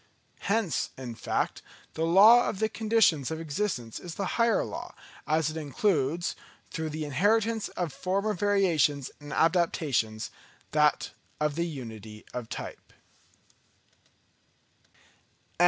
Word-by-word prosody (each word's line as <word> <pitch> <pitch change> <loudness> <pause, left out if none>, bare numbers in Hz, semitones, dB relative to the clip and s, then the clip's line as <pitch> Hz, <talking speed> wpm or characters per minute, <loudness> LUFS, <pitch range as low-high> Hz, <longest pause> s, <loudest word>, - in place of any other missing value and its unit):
Hence, 200 - 0
in 125 -3 -6
fact, - - -2 0.3
the 160 - -1
law 215 +8 +7
of - - -4
the 220 +2 +1
Conditions 215 - +2
of 160 0 -4
Existence 150 - -3
is 170 -3 -8
the 195 - -2 0.2
higher 230 0 +3
law; - - -7 0.3
as 155 0 +2
it 160 - -6
includes, 160 +1 0 0.4
through 160 -1 -3
the 155 0 -4
inheritance 215 - +1
of 175 -6 -2
former 195 +7 -1
variations 170 -9 +2
and 145 -1 -10
adaptations, 155 -10 +1 0.4
that 150 -1 +2 0.3
of 150 -1 0
Unity 115 - -6
of 120 -2 -5
Type. - - -8
160 Hz, 115 wpm, -28 LUFS, 140-200 Hz, 0.4 s, law